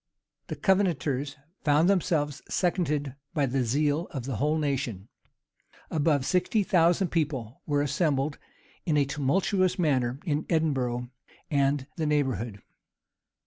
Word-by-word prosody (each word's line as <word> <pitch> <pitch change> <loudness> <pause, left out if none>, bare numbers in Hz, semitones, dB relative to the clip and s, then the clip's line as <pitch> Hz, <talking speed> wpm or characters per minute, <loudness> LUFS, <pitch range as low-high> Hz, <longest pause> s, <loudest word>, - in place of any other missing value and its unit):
The - - -4
Covenanters 155 -8 +1 0.3
found 150 +3 +4
themselves 160 -6 +1
seconded 150 -7 0 0.2
by 145 -3 +2
the 130 0 0
zeal 145 +6 +1
of 130 -5 -6
the 130 -5 -3
whole 150 +7 +1
nation. 130 -9 -2 0.8
Above 150 -3 +2
sixty 190 +5 +2
thousand 175 0 +3
people 135 -8 -2
were 145 -1 +2
assembled 145 -1 0 0.4
in 155 -4 +1
a 145 - +4
tumultuous 175 +7 +1
manner 135 -7 +1
in 150 -2 -1
Edinburgh 130 -7 0 0.4
and 140 -1 +2
the 160 -2 0
neighborhood. 120 -8 -1
145 Hz, 120 wpm, -27 LUFS, 135-165 Hz, 0.8 s, found